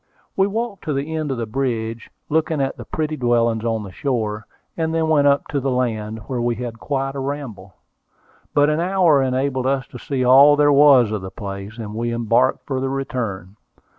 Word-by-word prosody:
We 195 0 +3
walked 220 -1 -4
to 155 - -1
the 145 +4 -3
end 155 -2 -2
of 135 - -2
the 115 - -2
bridge, 115 -2 -3 0.2
looking 160 0 0
at 135 -1 -1
the - - -10
pretty 155 -1 -3
dwellings 115 -4 +1
on 115 -2 -1
the 100 - -9
shore, 110 -3 -3 0.3
and 160 -1 -1
then 160 -1 +1
went 145 -2 +4
upon 140 0 +1
the 135 - -1
land, 110 -4 -2
where 125 -2 -3
we 120 0 0
had 120 -2 -6
quite 135 0 -2
a 140 - -5
ramble. 130 - -6 0.8
But 145 +1 +4
an 150 - 0
hour 175 -5 +3
enabled 130 0 0
us 135 -1 0
to 125 - -10
see 130 -1 -2
all 140 +3 +7
there 145 0 +4
was 140 -6 +6
of 105 -2 -2
the 95 - -6
place, 100 +1 -7
and 105 -3 -6
we 120 +2 -2
embarked 120 +2 +1
for 130 -2 -2
the 135 0 -2
return. 110 -8 -4
130 Hz, 200 wpm, -21 LUFS, 115-145 Hz, 0.8 s, all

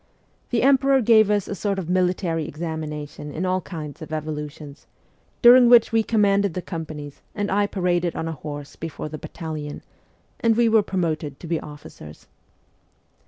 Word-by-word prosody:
The 240 -1 +1
emperor 275 0 +4
gave 220 -3 +5
us 205 -2 +1
a - - -4
sort 200 0 -2
of 185 -4 -4
military 180 -3 0
examina 155 -1 -5
tion 150 +1 -10
in 170 +5 -3
all 185 0 0
kinds 155 -6 -8
of 160 - -8
evolutions 150 -1 -6 0.6
during 245 0 +8
which 240 -2 +6
we 225 0 +3
com 220 -1 +1
manded 200 -2 +2
the 180 - -2
companies 155 -4 -7
and 205 -1 -2
I 205 +1 +2
paraded 180 -3 0
on 160 - -3
a - - -2
horse 145 -1 -8
before 155 -1 -6
the 155 0 -7
battalion 155 -3 -7 0.6
and 225 -1 +2
we 240 -1 +4
were 220 -1 +5
promoted 160 -7 -3
to - - -10
be 165 -1 -1
officers. 145 - -12
175 Hz, 170 wpm, -23 LUFS, 155-205 Hz, 0.6 s, during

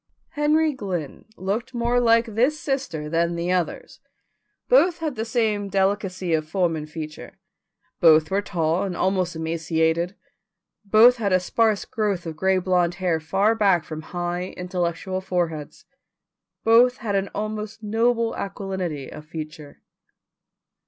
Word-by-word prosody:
Henry 300 +1 +2
Glynn 185 - -5
looked 225 +7 -3
more 240 +1 +1
like 230 -1 +4
this 250 +7 +1
sister 265 - -3
than 170 +2 0
the 170 +1 -1
others. 180 -2 -2 0.7
Both 365 -9 +4
had 320 -4 -3
the 220 -2 -3
same 220 -3 0
hard 200 - -8
delicacy 190 -2 0
of 155 -1 0
form 175 -1 +1
and 155 -1 -6
feature, 155 -1 -8 0.6
both 160 -1 +5
were 195 +1 +2
tall 170 -3 0
and 190 -3 -3
almost 185 -2 0
emaciated, 160 +2 0 0.7
both 220 +5 +6
had 205 -4 -1
a 185 - +4
sparse 215 +3 +1
growth 205 -5 -2
of 165 -1 -5
gray 190 +4 +2
blond 180 -1 +1
hair 175 -3 0
far 195 +7 +2
back 195 -7 +3
from 155 -2 -7
high 175 +2 -4
intellectual 180 +1 -2
foreheads, 170 -5 -3 0.8
both 240 +3 +5
had 205 -3 -3
an 195 0 0
almost 215 +1 -4
noble 230 +2 +1
aquilinity 190 -7 -4
of 150 - -11
feature. 155 -2 -9
190 Hz, 140 wpm, -23 LUFS, 170-220 Hz, 0.8 s, both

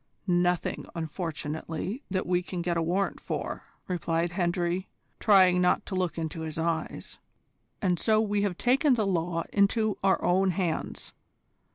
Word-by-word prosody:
"Nothing, 175 -1 +1
unfortunately, 160 - -4
that 185 -1 -1
we 180 0 +1
can 180 -1 -5
get 175 0 0
a 165 - +1
warrant 180 +4 0
for," - - -4 0.2
replied 170 -1 -1
Hendry, 175 0 -1 0.3
trying 185 -4 +5
not 180 - +2
to - - -7
look 180 -2 -1
into 160 0 -3
his 160 -1 -5
eyes, 165 -1 -3 0.6
"and 180 -3 +2
so 215 -1 +3
we 205 -2 +1
have 195 -4 -1
taken 260 +2 +3
the 220 -3 +1
law 170 -2 0
into 210 +1 +2
our 195 -1 +4
own 190 +2 +3
hands. 175 -3 -2
180 Hz, 150 wpm, -28 LUFS, 170-195 Hz, 0.6 s, trying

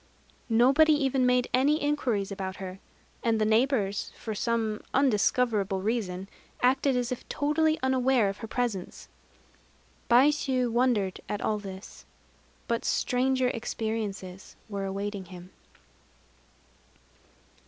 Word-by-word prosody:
Nobody 270 +7 +5
even 270 -3 +2
made 250 0 +2
any 270 +4 +4
inquiries 250 -9 -1
about 190 -1 -4
her. 190 0 -7 0.4
And 225 -2 +2
the 215 - +2
neighbors, 220 -3 +1
for 220 - -5
some 220 0 -1
undiscoverable 220 -5 +2
reason, 195 -4 -2 0.4
acted 265 +1 +3
as 245 0 -1
if 250 - -6
totally 310 +2 +1
unaware 260 -3 +3
of 195 +1 -3
her 225 - -7
presence. 225 -6 -3 1.0
Baishû 255 -1 +3
wondered 230 -6 +1
at 205 - -2
all 215 -1 0
this. 195 -1 -10 0.6
But 235 -1 -1
stranger 255 0 +1
experiences 220 -5 -4
were 200 -2 -4
awaiting 200 0 -4
him. 180 +1 -12
230 Hz, 110 wpm, -28 LUFS, 200-260 Hz, 1.0 s, Nobody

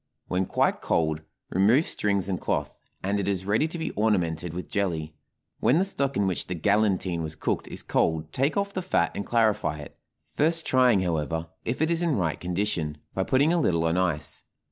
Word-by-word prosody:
When 90 0 0
quite - - +1
cold, 80 -1 0 0.3
remove 110 - +4
strings 100 -2 0
and 95 -2 -2
cloth, - - -2 0.2
and 100 +2 0
it 100 - -2
is 95 -2 -1
ready 110 +10 +2
to 170 - -6
be 160 -1 -3
ornamented 90 -6 0
with 90 +2 -6
jelly. 80 -6 -2 0.5
When 130 - +4
the 185 - +3
stock 140 -8 -1
in 100 - +2
which 90 -6 -2
the 90 - -3
galantine 95 -2 +1
was 80 0 -4
cooked - - -2
is - - -6
cold 80 -1 0
take 140 +7 +1
off 200 0 -1
the 185 - -2
fat 185 - +1
and 100 - -5
clarify 110 -10 +2
it, 75 - -10 0.4
first 165 +2 +1
trying, 125 -6 +4
however, 80 -1 -1 0.2
if 125 +6 0
it 160 - +1
is 170 0 +1
in 170 -5 +1
right 85 -7 -1
condition, 90 -4 -2 0.2
by 95 - 0
putting 140 - +3
a 175 - +2
little 85 - +2
on 80 +1 +1
ice. 85 -5 -1
95 Hz, 200 wpm, -26 LUFS, 85-130 Hz, 0.5 s, remove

